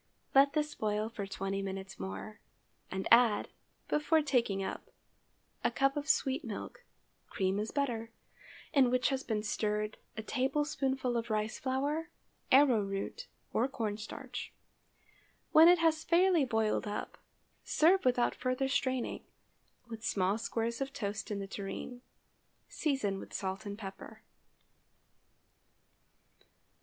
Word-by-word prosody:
Let 275 Hz, +1 st, +6 dB
this 300 Hz, -1 st, 0 dB
boil 215 Hz, 0 st, -1 dB
for 205 Hz, -3 st, -5 dB
twenty 195 Hz, 0 st, -3 dB
minutes 195 Hz, 0 st, -6 dB
more, 95 Hz, +2 st, -6 dB, 0.5 s
and 190 Hz, 0 st, -3 dB
add, 230 Hz, -2 st, +5 dB, 0.4 s
before 310 Hz, +1 st, +2 dB
taking 235 Hz, -9 st, +1 dB
up, -, -, -5 dB, 0.7 s
a -, -, +3 dB
cup 275 Hz, 0 st, +1 dB
of 290 Hz, +1 st, -3 dB
sweet 270 Hz, +3 st, +2 dB
milk -, -, -7 dB, 0.5 s
(cream 190 Hz, +1 st, 0 dB
is 215 Hz, +1 st, -2 dB
better) 235 Hz, -6 st, -1 dB, 0.6 s
in 270 Hz, -5 st, +5 dB
which 255 Hz, +1 st, +2 dB
has 270 Hz, -1 st, -1 dB
been 215 Hz, -2 st, -2 dB
stirred 210 Hz, 0 st, -1 dB, 0.2 s
a 220 Hz, -, -3 dB
tablespoonful 270 Hz, -1 st, 0 dB
of 230 Hz, 0 st, -3 dB
rice 215 Hz, 0 st, -1 dB
flour, 285 Hz, +5 st, -1 dB, 0.4 s
arrow 260 Hz, -5 st, +6 dB
root, 200 Hz, -, -4 dB, 0.3 s
or 245 Hz, -, +2 dB
corn 225 Hz, -6 st, -2 dB
starch. 245 Hz, +4 st, -7 dB, 1.0 s
When 320 Hz, +2 st, +9 dB
it 355 Hz, +1 st, +8 dB
has 320 Hz, -1 st, +2 dB
fairly 345 Hz, -2 st, +4 dB
boiled 220 Hz, -3 st, 0 dB
up, 205 Hz, -, -5 dB, 0.4 s
serve 360 Hz, +5 st, +4 dB
without 245 Hz, -1 st, +3 dB
further 255 Hz, +1 st, -1 dB
straining, 260 Hz, -2 st, -1 dB, 0.6 s
with 225 Hz, -1 st, -8 dB
small 195 Hz, 0 st, +1 dB
squares 230 Hz, +2 st, -2 dB
of 270 Hz, 0 st, -3 dB
toast 205 Hz, -3 st, -4 dB
in 210 Hz, -, -2 dB
the 200 Hz, -, -4 dB
tureen. 200 Hz, +5 st, -6 dB, 0.7 s
Season 265 Hz, -11 st, -1 dB
with -, -, -9 dB
salt 195 Hz, +2 st, -3 dB
and 200 Hz, 0 st, -5 dB
pepper. 195 Hz, -3 st, -9 dB
235 Hz, 130 wpm, -32 LUFS, 210-275 Hz, 1.0 s, When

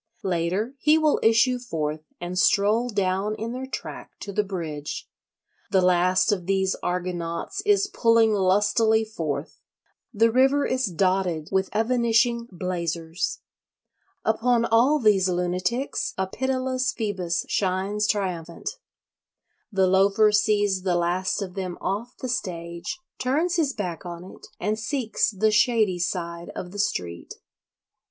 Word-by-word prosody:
Later 185 Hz, +6 st, -1 dB
he 305 Hz, +3 st, +4 dB
will 310 Hz, -2 st, +2 dB
issue 230 Hz, +3 st, +4 dB
forth 155 Hz, -10 st, -3 dB, 0.2 s
and 175 Hz, +1 st, -5 dB
stroll 215 Hz, +5 st, +3 dB
down 200 Hz, 0 st, 0 dB
in 225 Hz, +2 st, -4 dB
their 260 Hz, +1 st, -5 dB
track 270 Hz, -, -7 dB
to 200 Hz, -, -6 dB
the 210 Hz, -, +2 dB
bridge. 160 Hz, -7 st, -5 dB, 0.6 s
The 190 Hz, -, +3 dB
last 185 Hz, +3 st, +3 dB
of 185 Hz, -4 st, -2 dB
these 190 Hz, -1 st, +1 dB
Argonauts 175 Hz, -, -3 dB
is 400 Hz, -1 st, +4 dB
pulling 230 Hz, -, +3 dB
lustily 210 Hz, +3 st, +3 dB
forth; 155 Hz, -9 st, -5 dB, 0.5 s
the 230 Hz, +1 st, +3 dB
river 270 Hz, +4 st, +3 dB
is 255 Hz, -2 st, 0 dB
dotted 185 Hz, -3 st, 0 dB
with 190 Hz, -1 st, +1 dB
evanishing 235 Hz, +1 st, +2 dB
blazers. 170 Hz, -2 st, -3 dB, 0.8 s
Upon 230 Hz, +2 st, +2 dB
all 240 Hz, +7 st, +4 dB
these 205 Hz, -7 st, +3 dB
lunatics 180 Hz, +9 st, -1 dB
a 190 Hz, -, 0 dB
pitiless 255 Hz, +4 st, -1 dB
Phoebus 190 Hz, -5 st, -2 dB
shines 195 Hz, +2 st, 0 dB
triumphant. 185 Hz, -, -2 dB, 1.0 s
The 190 Hz, -2 st, +3 dB
Loafer 195 Hz, +3 st, +4 dB
sees 205 Hz, -2 st, +2 dB
the 180 Hz, -1 st, 0 dB
last 180 Hz, +4 st, 0 dB
of 185 Hz, -2 st, -7 dB
them 185 Hz, -2 st, -4 dB
off 210 Hz, +6 st, -3 dB
the 255 Hz, -, -5 dB
stage, 170 Hz, -, -4 dB, 0.2 s
turns 315 Hz, +8 st, +1 dB
his 305 Hz, -4 st, +2 dB
back 180 Hz, -, -5 dB
on 175 Hz, -1 st, -7 dB
it, 185 Hz, -, -13 dB
and 215 Hz, +3 st, -1 dB
seeks 230 Hz, 0 st, 0 dB
the 215 Hz, +1 st, +1 dB
shady 215 Hz, -4 st, +3 dB
side 170 Hz, -1 st, -3 dB
of 180 Hz, -, -6 dB
the 205 Hz, -, -7 dB
street. 90 Hz, -, -3 dB
200 Hz, 130 wpm, -25 LUFS, 180-230 Hz, 1.0 s, he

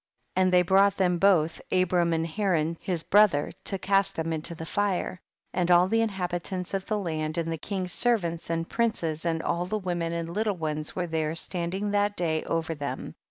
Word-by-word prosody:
21. 185 Hz, -, +4 dB
And -, -, +1 dB
they 180 Hz, -, +7 dB
brought 195 Hz, +2 st, +4 dB
them 180 Hz, -2 st, +2 dB
both, 165 Hz, -5 st, +3 dB
Abram 180 Hz, -2 st, +2 dB
and 165 Hz, 0 st, +1 dB
Haran 165 Hz, -3 st, 0 dB
his 175 Hz, -4 st, -2 dB
brother, 205 Hz, -8 st, +4 dB
to 195 Hz, -, -1 dB
cast 195 Hz, +1 st, +1 dB
tiiem 165 Hz, 0 st, -2 dB
into 160 Hz, +2 st, -3 dB
the 160 Hz, -, -7 dB
fire; 190 Hz, -1 st, -1 dB, 0.3 s
and 180 Hz, -1 st, 0 dB
all 175 Hz, +1 st, +6 dB
the 225 Hz, +3 st, +2 dB
inhabitants 180 Hz, -3 st, -3 dB
of 195 Hz, -1 st, -2 dB
the 215 Hz, -, 0 dB
land 155 Hz, -5 st, -2 dB
and 165 Hz, -1 st, -1 dB
the 165 Hz, -, -2 dB
king's 185 Hz, 0 st, -3 dB
servants 175 Hz, -10 st, 0 dB
and 165 Hz, 0 st, -1 dB
princes 170 Hz, -9 st, -1 dB
and 165 Hz, -1 st, 0 dB
all 175 Hz, +1 st, -1 dB
the 215 Hz, +3 st, -1 dB
women 175 Hz, -4 st, -2 dB
and 170 Hz, 0 st, -3 dB
little 205 Hz, +2 st, -1 dB
ones 155 Hz, -1 st, -3 dB
were 180 Hz, -, -1 dB
there, 160 Hz, -1 st, -1 dB
standing 185 Hz, +4 st, -1 dB
that 205 Hz, 0 st, +1 dB
day 160 Hz, -3 st, 0 dB
over 165 Hz, 0 st, -1 dB
them. 145 Hz, -2 st, -5 dB
175 Hz, 200 wpm, -27 LUFS, 165-195 Hz, 0.3 s, they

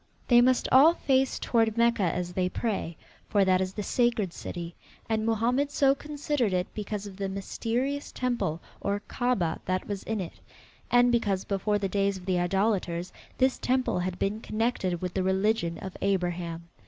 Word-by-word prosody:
They 240 Hz, -1 st, +7 dB
must 255 Hz, +1 st, +3 dB
all 300 Hz, +6 st, +7 dB
face 265 Hz, -3 st, +1 dB
toward 225 Hz, -2 st, +1 dB
Mecca 235 Hz, -1 st, +3 dB
as 180 Hz, 0 st, -1 dB
they 180 Hz, 0 st, 0 dB
pray, 190 Hz, -7 st, -3 dB, 0.3 s
for 200 Hz, -2 st, +3 dB
that 185 Hz, 0 st, +3 dB
is 185 Hz, 0 st, -2 dB
the 210 Hz, -, -4 dB
sacred 230 Hz, -6 st, +1 dB
city; 170 Hz, -1 st, -6 dB, 0.3 s
and 220 Hz, -1 st, 0 dB
Mohammed 240 Hz, +6 st, +1 dB
so 275 Hz, -1 st, +3 dB
considered 290 Hz, -6 st, -2 dB
it 180 Hz, 0 st, +1 dB
because 210 Hz, -1 st, -4 dB
of 195 Hz, -2 st, -9 dB
the 195 Hz, -1 st, -2 dB
mysterious 240 Hz, +8 st, -2 dB
temple 240 Hz, -11 st, -1 dB, 0.2 s
or 200 Hz, +1 st, -1 dB
Kaabah 245 Hz, -10 st, 0 dB
that 185 Hz, 0 st, -1 dB
was 200 Hz, -2 st, -3 dB
in 220 Hz, -1 st, -3 dB
it, 180 Hz, -3 st, -5 dB, 0.6 s
and 245 Hz, 0 st, +5 dB
because, 205 Hz, -5 st, +1 dB
before 205 Hz, +1 st, 0 dB
the 200 Hz, -1 st, -1 dB
days 200 Hz, 0 st, 0 dB
of 180 Hz, -, -12 dB
the 185 Hz, -2 st, +1 dB
idolaters, 180 Hz, -1 st, 0 dB, 0.2 s
this 260 Hz, 0 st, +2 dB
temple 255 Hz, -7 st, +1 dB
had 180 Hz, 0 st, -2 dB
been 200 Hz, +3 st, -1 dB
connected 215 Hz, -7 st, -1 dB
with 180 Hz, -1 st, -3 dB
the 190 Hz, -, 0 dB
religion 190 Hz, -2 st, +1 dB
of 190 Hz, -1 st, -7 dB
Abraham. 175 Hz, -3 st, -1 dB
200 Hz, 175 wpm, -28 LUFS, 185-240 Hz, 0.6 s, They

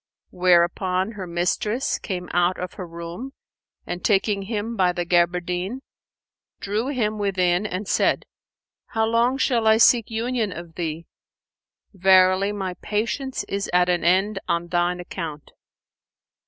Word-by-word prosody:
Whereupon 180 Hz, +2 st, +2 dB
her 195 Hz, -4 st, -7 dB
mistress 180 Hz, +8 st, -1 dB
came 180 Hz, -3 st, -5 dB
out 175 Hz, +1 st, +2 dB
of 180 Hz, 0 st, -5 dB
her 185 Hz, -, -7 dB
room 170 Hz, +10 st, -7 dB, 0.5 s
and, 175 Hz, 0 st, -5 dB
taking 200 Hz, -1 st, +2 dB
him 220 Hz, +3 st, -3 dB
by 185 Hz, -3 st, +2 dB
the 175 Hz, -1 st, -2 dB
gaberdine,[FN#476] 180 Hz, +5 st, 0 dB, 0.8 s
drew 210 Hz, +5 st, -2 dB
him 220 Hz, -6 st, -1 dB
within 185 Hz, -1 st, +1 dB
and 190 Hz, +1 st, -4 dB
said, -, -, +1 dB, 0.6 s
"How 220 Hz, -1 st, 0 dB
long 235 Hz, +3 st, +2 dB
shall 240 Hz, -4 st, +1 dB
I 220 Hz, 0 st, +6 dB
seek 230 Hz, 0 st, +5 dB
union 230 Hz, -1 st, -1 dB
of 170 Hz, -1 st, -9 dB
thee? 165 Hz, -1 st, -4 dB, 0.9 s
Verily 190 Hz, +1 st, +4 dB
my 190 Hz, -3 st, -3 dB
patience 235 Hz, +5 st, -2 dB
is 200 Hz, 0 st, -3 dB
at 180 Hz, 0 st, +4 dB
an 175 Hz, -1 st, +1 dB
end 190 Hz, +4 st, +2 dB
on 170 Hz, 0 st, -1 dB
thine 175 Hz, 0 st, 0 dB
account. 165 Hz, -4 st, -7 dB
190 Hz, 135 wpm, -23 LUFS, 175-215 Hz, 0.9 s, I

